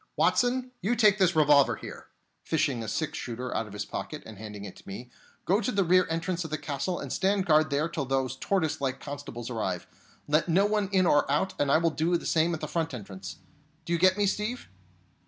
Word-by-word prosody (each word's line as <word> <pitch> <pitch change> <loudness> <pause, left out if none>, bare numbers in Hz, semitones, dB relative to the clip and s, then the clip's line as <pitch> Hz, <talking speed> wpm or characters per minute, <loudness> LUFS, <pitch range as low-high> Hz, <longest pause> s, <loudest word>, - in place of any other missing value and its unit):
Watson, 250 +1 +2
you 225 +6 +1
take 210 -3 +4
this 185 -3 +3
revolver 145 -3 +5
here," - - -10 0.4
fishing 145 -7 0
a 110 - -5
six 155 +7 -2
shooter 125 +1 -5
out 115 - -1
of 105 - -11
his 105 -1 -4
pocket - - -6
and 110 -3 -11
handing 105 -2 -7
it 100 - -9
to - - -17
me, 120 +6 -8 0.3
"go 195 +5 +2
to 235 - -1
the 200 -3 +2
rear 185 +1 +4
entrance 165 +2 -1
of 160 - -6
the 155 - -2
castle, 145 +4 -3
and - - -5
stand 195 0 +1
guard 155 -1 +4
there 145 +2 +1
till 155 -4 -3
those 130 -1 -1
tortoise 160 0 -1
like 135 -1 -1
constables 125 -4 -7
arrive. 95 -6 -2 0.4
Let 155 +4 +2
no 190 +5 +4
one 205 -2 0
in 190 -2 +3
or 145 -4 +3
out; 170 +6 +1
and 145 -1 +2
I - - +6
will 165 0 +2
do 165 +3 +1
the - - -10
same 165 +1 +2
at 155 - -9
the - - -3
front 160 -5 -2
entrance. 95 -4 -8 0.5
Do 170 - -1
you 170 - +1
get 185 +2 +5
me, 205 - +2
Steve?" 210 +5 -2
155 Hz, 230 wpm, -28 LUFS, 130-185 Hz, 0.5 s, I